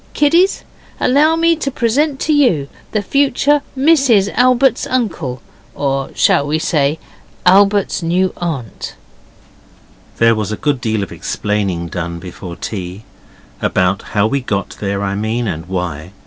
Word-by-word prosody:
'Kiddies, 335 +7 +3 0.4
allow 295 +5 +3
me 335 0 +3
to 300 -3 -2
present 270 +4 0
you 260 - +3
to - - -21 0.2
the 215 - 0
future 280 +3 +2 0.2
Mrs 265 -9 +3
Albert's 255 0 +3
uncle, 170 - -2 0.3
or 135 -1 -1
shall 140 - +3
we 150 +2 +1
say 150 -2 +1 0.5
Albert's 200 +1 +4
new 180 +3 +1
aunt?' 140 - -5 1.2
There 115 0 +4
was 110 -1 -2
a 110 - -3
good 145 -4 -1
deal 110 -3 -1
of 95 - -7
explaining 100 -5 -2
done 85 0 -4
before 90 0 -8
tea 95 +1 -6 0.6
about 95 +1 +1 0.2
how 100 - +4
we 135 +5 0
got 100 -5 -2
there, 100 0 -2
I 100 0 -1
mean, 110 +3 -2
and 80 -2 -4
why. 90 -2 -4
140 Hz, 140 wpm, -16 LUFS, -, 1.2 s, Albert's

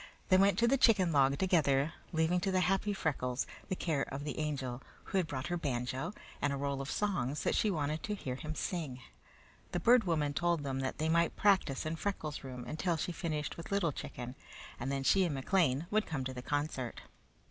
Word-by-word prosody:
They 185 - +7
went 195 +1 +4
to 235 - +4
the 270 +2 +3
chicken 195 -9 +5
log 140 -2 +4
together, 155 -5 +2 0.2
leaving 165 +1 +2
to 190 +2 0
the 185 -1 +3
happy 195 +3 +2
Freckles 135 -9 -1 0.2
the 185 - 0
care 160 -6 0
of 140 +1 -4
the 150 0 -4
Angel, 135 -5 -2 0.2
who 195 - 0
had 175 - 0
brought 130 -4 -4
her 175 0 -1
banjo 130 +1 -2 0.3
and 145 - +2
a 140 - -1
roll 140 0 -1
of 135 - -5
songs 175 -10 -1
that - - +2
she 215 - +2
wanted 155 -3 -1
to 210 - -2
hear 130 -10 -4
him 155 +4 -5
sing. 145 -3 -3 0.7
The - - +1
Bird 240 -2 +5
Woman 150 -4 +1
told 170 -1 +1
them 135 -1 -2
that 135 0 -2
they 155 - 0
might 170 +1 +2
practice 190 -10 +2
in 160 +1 -2
Freckles' 160 -7 -3
room 125 -2 -7
until 165 +2 -1
she 165 - -2
finished 155 -3 -3
with 165 - -8
Little 200 -5 +2
Chicken, 125 -2 -6 0.5
and 135 +3 -2
then 135 -1 -1
she 190 +7 +5
and 165 -5 0
McLean 145 0 +2
would 215 0 +2
come 145 -5 -2
to 130 - -3
the 125 - -6
concert. 145 -3 -2
155 Hz, 210 wpm, -33 LUFS, 135-180 Hz, 0.7 s, They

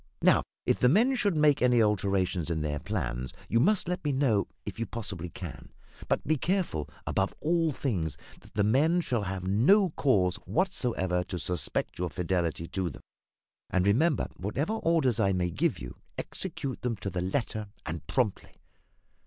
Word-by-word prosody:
Now, - - +6 0.2
if - - +2
the 125 - +5
men 230 - +4
should 205 -9 +1
make 150 -2 +4
any 125 -1 +4
alterations 95 -5 +1
in 80 -2 -1
their 75 -1 -2
plans, 65 - -3
you 115 - +2
must 190 - +3
let 180 +1 -2
me 145 - +1
know, 130 -7 +2 0.2
if - - -6
you 115 - -1
possibly 95 -6 -4
can; 85 -4 -8 0.4
but - - 0
be 155 +2 +2
careful, 175 - -1 0.2
above 95 0 0
all 165 0 +2
things, 85 - -2 0.2
that - - -19
the 105 - +3
men 150 - +3
shall 120 -8 -1
have 95 -2 -4
no 175 - +5
cause 100 - +2
whatever 115 - 0
to 90 - -5
suspect 90 0 -2
your 90 0 -1
fidelity 85 -1 -1
to 95 -3 -1
them. 70 - -11 0.7
And, 90 0 +1
remember, 135 +10 +3
whatever 135 - -2
orders 165 - +2
I 100 -3 +3
may 90 -1 0
give - - +1
you, - - -8 0.2
execute 135 -2 -4
them 120 -2 -1
to 100 0 -4
the 90 0 -2
letter, 105 +2 -2 0.2
and 80 -1 -5
promptly. 120 -7 -1
105 Hz, 170 wpm, -29 LUFS, 90-145 Hz, 0.7 s, Now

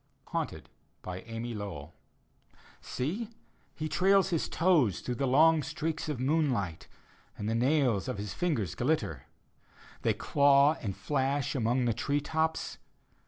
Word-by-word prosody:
HAUNTED: - - -3 0.4
amy 115 +6 -5
lowbll 95 -8 -6 0.9
Seel 185 - -3 0.5
He 155 - -3
trails 195 +3 +3
his 165 - 0
toes 155 - +3
Through 125 - -3
the 135 +3 -1
long 155 +4 +5
streaks 155 +3 -3
of 145 -5 -3
moonlight. 130 - 0 0.5
And 105 - -4
the 110 - 0
nails 125 -3 +2
of 130 -4 -3
his 100 -1 -5
fingers 145 - -1
glitter; - - -1 0.7
They - - +1
claw 140 +1 +4
and 100 -4 -4
flash 140 0 0
among 125 0 +1
the 120 - +2
tree 140 +6 0
tops. 160 +2 -2
135 Hz, 130 wpm, -30 LUFS, 115-155 Hz, 0.9 s, long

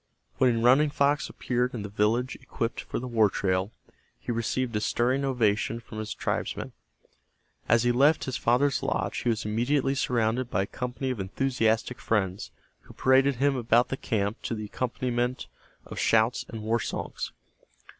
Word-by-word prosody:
When 120 -3 +3
Running 135 +5 +5
Fox 140 0 +1
appeared 125 0 -1
in 110 - -4
the - - -4
village 110 +5 0
equipped 115 +1 -3
for - - -5
the 125 - -4
war 110 -4 +3
trail, 95 +1 -1 0.5
he - - -5
received 115 +1 -1
a 105 - 0
stirring 125 +5 +1
ovation 115 -3 +1
from 110 -1 -9
his 110 0 -4
tribesmen. - - -3 1.0
As 115 0 +4
he 120 - +3
left 140 +6 +4
his 130 - -3
father's 130 +4 +2
lodge - - -1
he 120 - -1
was 110 -2 -1
immediately 130 +6 +1
surrounded 125 -3 0
by 95 -3 +1
a - - -3
company 125 +4 -4
of 125 - -4
enthusiastic 115 +3 0
friends, 100 -2 -1 0.3
who - - -17
paraded 135 +1 +4
him 140 +2 +2
about 120 0 +3
the - - -1
camp 105 -3 -2
to 115 - -3
the 105 -1 -5
accompaniment 125 +1 -2 0.4
of - - -7
shouts 115 +2 +2
and 110 -2 -7
war 115 +2 +1
songs. - - -4
120 Hz, 165 wpm, -27 LUFS, 110-130 Hz, 1.0 s, Running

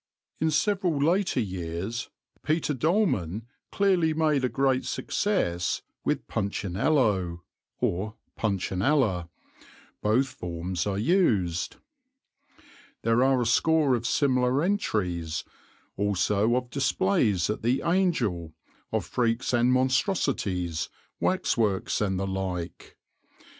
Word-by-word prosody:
In 160 - +2
several 185 0 +1
later 170 +2 +2
years 95 +3 -4 0.3
Peter 155 -1 0
Dolman 125 - 0 0.3
clearly 180 -6 +2
made 155 -4 +2
a 125 - +2
great 135 -1 +1
success 90 - -1 0.2
with - - -1
Punchinello 100 - 0 0.3
or 105 +5 -1 0.2
Puntionella 100 - 0 0.7
both 115 +6 +2
forms 90 -5 -4
are 100 -1 -1
used. 105 - +1 1.3
There 115 +2 +3
are 135 -1 +3
a - - -2
score 150 +4 +3
of 120 -1 0
similar 130 +1 +2
entries, 90 - -1 0.5
also 105 +3 +1
of 125 -1 -2
displays 135 - +1
at 105 - -4
the 120 +4 +1
"Angel," 120 - 0 0.4
of - - -1
freaks 120 0 0
and 120 +1 +3
monstrosities, 130 - 0 0.3
waxworks 115 - +1
and 95 -3 0
the 95 - -1
like. 95 -3 -4
115 Hz, 100 wpm, -27 LUFS, 95-150 Hz, 1.3 s, There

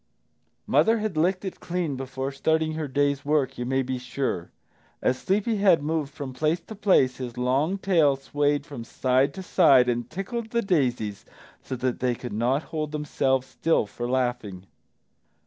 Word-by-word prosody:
Mother 225 +1 +3
had 215 -5 -3
licked 180 +5 +1
it 190 - -5
clean 170 -5 -2
before 135 +1 -4
starting 160 +3 0
her 155 -1 -3
day's 140 0 0
work, 145 -3 0
you 120 - -3
may 135 +1 +1
be 130 0 -3
sure. 125 -9 -3 0.5
As 130 - 0
Sleepy 210 +3 0
head 190 -7 +4
moved 155 -2 -1
from 140 -3 -7
place 155 +6 0
to 195 - -11
place 185 -11 +3
his 125 -2 -6
long 135 +9 +1
tail 165 -8 +3
swayed 145 +1 0
from 140 -6 -7
side 130 +4 +1
to 190 - -6
side 140 -9 +5
and 120 -1 -1
tickled 220 +6 -4
the 235 0 0
daisies 125 - 0 0.4
so 130 - -5
that 125 0 -2
they 125 -1 +1
could 125 -1 -7
not 125 +7 +1
hold 155 -1 -2
themselves 135 -3 0
still 130 +1 +1
for 120 +4 -5
laughing. 120 -7 -2
140 Hz, 170 wpm, -25 LUFS, 125-165 Hz, 0.5 s, side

